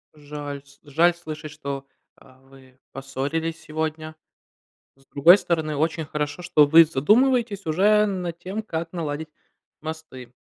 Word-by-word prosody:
Жаль, 145 Hz, -1 st, -7 dB
с 140 Hz, 0 st, -22 dB
жаль 165 Hz, +4 st, +3 dB
слышать, 155 Hz, -2 st, -8 dB
что, 140 Hz, -2 st, -6 dB, 0.3 s
а, 130 Hz, 0 st, -21 dB
вы 135 Hz, -1 st, -19 dB
поссорились 140 Hz, +5 st, -4 dB
сегодня. 155 Hz, 0 st, -4 dB, 0.8 s
С 135 Hz, 0 st, -27 dB
другой 165 Hz, +9 st, +6 dB
стороны, 160 Hz, -5 st, -2 dB
очень 160 Hz, +2 st, -1 dB
хорошо, 150 Hz, +1 st, -4 dB
что 175 Hz, -4 st, +4 dB
вы 165 Hz, +3 st, +8 dB
задумываетесь 210 Hz, -, +2 dB
уже 205 Hz, +7 st, +4 dB
над 180 Hz, -4 st, -4 dB
тем, 190 Hz, +5 st, -5 dB
как 165 Hz, -5 st, -5 dB
наладить 160 Hz, -2 st, -4 dB, 0.5 s
мосты. 155 Hz, -6 st, -9 dB
155 Hz, 130 wpm, -24 LUFS, 145-170 Hz, 0.8 s, вы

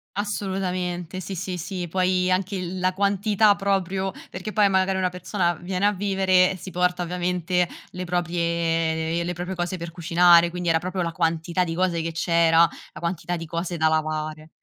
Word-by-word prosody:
Assolutamente, 185 Hz, -3 st, -3 dB
sì, 190 Hz, +2 st, -6 dB
sì, 185 Hz, 0 st, -4 dB
sì, 180 Hz, 0 st, -4 dB
poi 185 Hz, +1 st, +1 dB
anche 190 Hz, +2 st, 0 dB
il 185 Hz, 0 st, -4 dB
la 185 Hz, 0 st, +1 dB
quantità 200 Hz, +1 st, +3 dB
proprio 195 Hz, -1 st, -1 dB, 0.2 s
perché 190 Hz, +3 st, -6 dB
poi 205 Hz, -2 st, +4 dB
magari 190 Hz, 0 st, +2 dB
una 185 Hz, -1 st, +1 dB
persona 180 Hz, -1 st, -1 dB
viene 185 Hz, +4 st, -1 dB
a -, -, +3 dB
vivere, 190 Hz, -1 st, +2 dB
si 190 Hz, -, -9 dB
porta 180 Hz, 0 st, 0 dB
ovviamente 180 Hz, 0 st, 0 dB, 0.2 s
le 180 Hz, 0 st, -5 dB
proprie 170 Hz, -1 st, 0 dB
le 175 Hz, +1 st, -2 dB
proprie 180 Hz, +2 st, -5 dB
cose 175 Hz, +1 st, -2 dB
per 170 Hz, 0 st, -6 dB
cucinare, 170 Hz, 0 st, +5 dB
quindi 180 Hz, -1 st, -2 dB
era 165 Hz, -, +4 dB
proprio 185 Hz, +2 st, -3 dB
la 170 Hz, -1 st, -1 dB
quantità 165 Hz, +1 st, 0 dB
di 165 Hz, -2 st, -3 dB
cose 170 Hz, -2 st, 0 dB
che 165 Hz, -, -2 dB
c'era, 165 Hz, 0 st, +3 dB, 0.3 s
la -, -, -10 dB
quantità 175 Hz, +1 st, -2 dB
di 165 Hz, -, -7 dB
cose 170 Hz, +2 st, -3 dB
da 160 Hz, 0 st, +3 dB
lavare. 155 Hz, 0 st, -2 dB
180 Hz, 175 wpm, -24 LUFS, 170-185 Hz, 0.3 s, cucinare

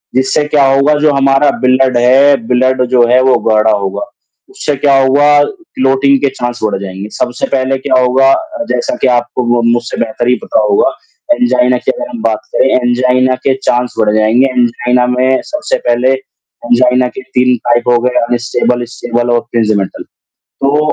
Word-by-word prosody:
जिससे 135 Hz, +3 st, +1 dB
क्या 145 Hz, -2 st, +2 dB
होगा 140 Hz, +2 st, +2 dB
जो 150 Hz, -, +4 dB
हमारा 135 Hz, +1 st, +2 dB
ब्लड 130 Hz, -1 st, +2 dB
है 135 Hz, +4 st, +4 dB
ब्लड 130 Hz, +1 st, +1 dB
जो 120 Hz, -1 st, +5 dB
है 125 Hz, +2 st, +3 dB
वो -, -, +3 dB
गाढ़ा 110 Hz, 0 st, +3 dB
होगा, 100 Hz, -, -3 dB, 0.4 s
उससे 390 Hz, -, -3 dB
क्या 140 Hz, 0 st, +2 dB
होगा 145 Hz, +2 st, +3 dB
क्लॉटिंग 140 Hz, -, 0 dB
के 140 Hz, -, +1 dB
चांस 120 Hz, 0 st, -4 dB
बढ़ 105 Hz, -2 st, -1 dB
जाएँगे। 95 Hz, +2 st, -7 dB
सबसे 125 Hz, 0 st, -2 dB
पहले 135 Hz, +1 st, -1 dB
क्या 130 Hz, -, +3 dB
होगा 135 Hz, +2 st, +3 dB
अ, 315 Hz, -2 st, -4 dB
जैसा 300 Hz, +1 st, -2 dB
कि -, -, +2 dB
आपको 120 Hz, +1 st, -3 dB
मु 120 Hz, -, +1 dB
मुझसे 120 Hz, 0 st, -3 dB
बेहतर 120 Hz, +2 st, -4 dB
ही 125 Hz, -, +3 dB
पता -, -, 0 dB
होगा, 100 Hz, -, +2 dB, 0.5 s
एंजाइना 125 Hz, -, +1 dB
की -, -, -1 dB
अगर 295 Hz, -, -7 dB
हम 235 Hz, -4 st, -8 dB
बात 110 Hz, -1 st, -1 dB
करें, 135 Hz, -, +2 dB, 0.2 s
एंजाइना 130 Hz, +1 st, +1 dB
के 135 Hz, -, +3 dB, 0.2 s
चांस 125 Hz, 0 st, -1 dB
बढ़ 105 Hz, 0 st, +1 dB
जाएँगे, 115 Hz, +5 st, +2 dB
एंजाइना 125 Hz, +1 st, +1 dB
में 130 Hz, +1 st, +1 dB
सबसे 305 Hz, 0 st, -2 dB
पहले, 125 Hz, +2 st, +2 dB, 0.5 s
एंजाइना 125 Hz, +1 st, +2 dB
के 200 Hz, -, -9 dB
3 125 Hz, 0 st, +2 dB
टाइप 120 Hz, 0 st, +1 dB
हो 120 Hz, -, +4 dB
गए 125 Hz, 0 st, 0 dB
अनस्टेबल, 120 Hz, +1 st, -1 dB
स्टेबल 120 Hz, 0 st, -3 dB
और 120 Hz, -, +2 dB
प्रिंज़मेटल, 110 Hz, -4 st, -1 dB, 0.4 s
तो 140 Hz, +2 st, -2 dB
125 Hz, 175 wpm, -12 LUFS, 120-135 Hz, 0.5 s, जो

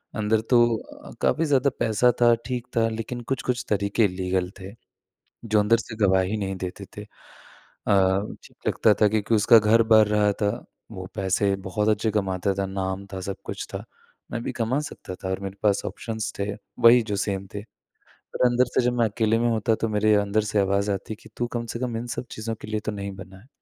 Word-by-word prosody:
अंदर 110 Hz, 0 st, +1 dB
तो 120 Hz, -2 st, +1 dB
काफ़ी 165 Hz, -, +2 dB
ज़्यादा 140 Hz, -2 st, +3 dB
पैसा 115 Hz, +2 st, +3 dB
था, 120 Hz, 0 st, +7 dB
ठीक 125 Hz, 0 st, -4 dB
था, 115 Hz, -, +4 dB
लेकिन 115 Hz, +2 st, -5 dB
कुछ-कुछ 125 Hz, 0 st, -2 dB
तरीक़े 100 Hz, +2 st, +2 dB
इलीगल 90 Hz, -1 st, -1 dB
थे, 95 Hz, +1 st, -9 dB, 0.7 s
जो 110 Hz, -1 st, +2 dB
अंदर 105 Hz, +3 st, +4 dB
से 115 Hz, 0 st, -7 dB
गवाही 95 Hz, +2 st, +2 dB
नहीं 95 Hz, -2 st, -3 dB
देते 95 Hz, +2 st, -6 dB
थे 105 Hz, -, -5 dB
अ, 105 Hz, -, -11 dB, 0.8 s
लगता 110 Hz, -, +4 dB
था 105 Hz, -, +7 dB
क्योंकि 110 Hz, +1 st, +1 dB
उसका 115 Hz, +2 st, +6 dB
घर 110 Hz, +2 st, +4 dB
भर 110 Hz, -1 st, +7 dB
रहा 105 Hz, -1 st, +2 dB
था 100 Hz, -, +3 dB, 0.4 s
वो 95 Hz, -3 st, -7 dB
पैसे 100 Hz, 0 st, +1 dB
बहुत 105 Hz, +3 st, 0 dB
अच्छे 110 Hz, +1 st, +1 dB
कमाता 95 Hz, -1 st, 0 dB
था, 100 Hz, -, -1 dB
नाम 95 Hz, 0 st, -3 dB
था, 95 Hz, -, -4 dB
सब 95 Hz, +1 st, -4 dB
कुछ -, -, -5 dB
था। -, -, -4 dB, 0.5 s
मैं 115 Hz, -, -3 dB
भी -, -, -3 dB
कमा 120 Hz, +4 st, 0 dB
सकता 95 Hz, -, -8 dB
था 95 Hz, -, -6 dB
और 95 Hz, +1 st, -2 dB
मेरे 95 Hz, 0 st, -6 dB
पास 100 Hz, -1 st, +3 dB
ऑप्शंस 110 Hz, -2 st, -4 dB
थे, 100 Hz, +1 st, -1 dB, 0.3 s
वही 120 Hz, +1 st, +7 dB
जो 105 Hz, -2 st, -3 dB
सेम 100 Hz, -1 st, -2 dB
थे। 100 Hz, -, -3 dB, 0.5 s
पर -, -, -1 dB
अंदर 125 Hz, +1 st, +3 dB
से -, -, +3 dB
जब 125 Hz, -, +2 dB
मैं 120 Hz, -, +4 dB
अकेले 110 Hz, +1 st, +1 dB
में 120 Hz, -, +1 dB
होता 110 Hz, 0 st, +1 dB
तो 115 Hz, -, +1 dB
मेरे 105 Hz, 0 st, +3 dB
अंदर 100 Hz, +1 st, +1 dB
से 105 Hz, -, +2 dB
आवाज़ 100 Hz, +1 st, +1 dB
आती 100 Hz, +2 st, -4 dB
कि -, -, -16 dB
तू 120 Hz, -, -1 dB
कम 115 Hz, 0 st, -2 dB
से 115 Hz, -, -3 dB
कम 120 Hz, -3 st, -2 dB
इन 120 Hz, -, -5 dB
सब -, -, -4 dB
चीज़ों 115 Hz, +1 st, -4 dB
के -, -, -9 dB
लिए 110 Hz, 0 st, -2 dB
तो 110 Hz, -, -1 dB
नहीं 100 Hz, -1 st, -5 dB
बना 95 Hz, 0 st, -11 dB
है। 120 Hz, -, -22 dB
105 Hz, 210 wpm, -25 LUFS, 100-115 Hz, 0.8 s, था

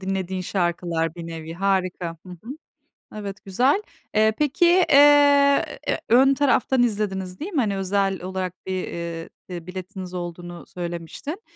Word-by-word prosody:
dinlediğin 190 Hz, -1 st, -3 dB
şarkılar 175 Hz, -3 st, -1 dB
bir 170 Hz, -1 st, -7 dB
nevi. 165 Hz, 0 st, -7 dB
Harika. 185 Hz, -2 st, -1 dB
Hı -, -, -11 dB
hı. 180 Hz, +7 st, -11 dB, 0.7 s
Evet, 205 Hz, -1 st, -7 dB
güzel. 255 Hz, -, +2 dB, 0.3 s
Eee, 220 Hz, 0 st, +4 dB
peki, 300 Hz, +3 st, +2 dB, 0.2 s
eee, 285 Hz, 0 st, +6 dB, 0.4 s
ön 265 Hz, +4 st, +6 dB
taraftan 265 Hz, -2 st, +2 dB
izlediniz, 195 Hz, -5 st, -2 dB
değil 360 Hz, +7 st, -5 dB
mi? 305 Hz, -, +2 dB
Hani 205 Hz, -5 st, 0 dB
özel 195 Hz, 0 st, 0 dB
olarak 185 Hz, -1 st, -3 dB
bir, 185 Hz, -1 st, -2 dB
eee, 170 Hz, -1 st, -5 dB, 0.2 s
bir 175 Hz, -2 st, -7 dB
biletiniz 185 Hz, 0 st, -7 dB
olduğunu 175 Hz, 0 st, -6 dB
söylemiştin. 175 Hz, -, -6 dB
190 Hz, 135 wpm, -23 LUFS, 175-240 Hz, 0.7 s, eee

